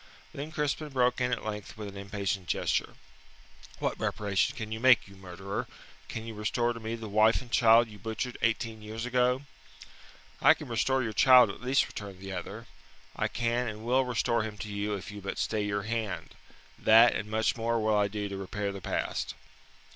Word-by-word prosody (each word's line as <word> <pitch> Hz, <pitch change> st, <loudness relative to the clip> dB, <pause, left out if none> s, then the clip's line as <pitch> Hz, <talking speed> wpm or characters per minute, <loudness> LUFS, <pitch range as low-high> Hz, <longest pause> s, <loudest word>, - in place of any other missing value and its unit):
Then 145 Hz, +3 st, -6 dB
Crispin 150 Hz, 0 st, -2 dB
broke 125 Hz, -2 st, +1 dB
in 125 Hz, 0 st, +1 dB
at 125 Hz, -, -2 dB
length 105 Hz, -1 st, -6 dB
with 105 Hz, -1 st, -6 dB
an 100 Hz, -, -9 dB
impatient 100 Hz, -2 st, -3 dB
gesture. -, -, 0 dB, 0.8 s
"What -, -, -2 dB
reparation 100 Hz, -2 st, 0 dB
can 110 Hz, -1 st, -5 dB
you 110 Hz, -, -3 dB
make, 125 Hz, -3 st, +5 dB
you 100 Hz, -, -14 dB
murderer? 95 Hz, +1 st, -5 dB, 0.4 s
Can 115 Hz, -, -6 dB
you 115 Hz, -, -6 dB
restore 120 Hz, +3 st, 0 dB
to 115 Hz, -, -8 dB
me 110 Hz, +1 st, -4 dB
the 110 Hz, -1 st, -7 dB
wife 110 Hz, +2 st, +4 dB
and 125 Hz, -2 st, -12 dB
child 115 Hz, 0 st, +6 dB
you 105 Hz, -2 st, -13 dB
butchered 115 Hz, +4 st, -4 dB
eighteen 115 Hz, -1 st, 0 dB
years 110 Hz, +2 st, -5 dB
ago?" 125 Hz, +1 st, +2 dB, 1.0 s
"I -, -, +7 dB
can -, -, -9 dB
restore 130 Hz, +3 st, +1 dB
your 110 Hz, -2 st, -3 dB
child 125 Hz, -2 st, +7 dB
at -, -, -12 dB
least," 130 Hz, +2 st, +2 dB
returned 100 Hz, -3 st, -8 dB
the 95 Hz, 0 st, -7 dB
other. 100 Hz, +5 st, -6 dB, 0.5 s
"I -, -, 0 dB
can 120 Hz, +1 st, -1 dB
and 110 Hz, 0 st, -6 dB
will 130 Hz, +2 st, +3 dB
restore 120 Hz, -2 st, 0 dB
him 105 Hz, -1 st, -5 dB
to 105 Hz, -, -6 dB
you 100 Hz, 0 st, -2 dB
if 100 Hz, +1 st, -7 dB
you 105 Hz, 0 st, -8 dB
but 100 Hz, -, -5 dB
stay 110 Hz, -1 st, 0 dB
your 100 Hz, 0 st, -1 dB
hand. 110 Hz, -6 st, -3 dB, 0.5 s
That 115 Hz, +2 st, +7 dB
and 105 Hz, 0 st, -3 dB
much 110 Hz, 0 st, +1 dB
more 115 Hz, 0 st, 0 dB
will 110 Hz, -1 st, +2 dB
I 105 Hz, -1 st, +3 dB
do 105 Hz, 0 st, -4 dB
to 100 Hz, -1 st, -5 dB
repair 100 Hz, +1 st, -3 dB
the 100 Hz, -1 st, -8 dB
past." -, -, -2 dB
110 Hz, 200 wpm, -29 LUFS, 100-120 Hz, 1.0 s, I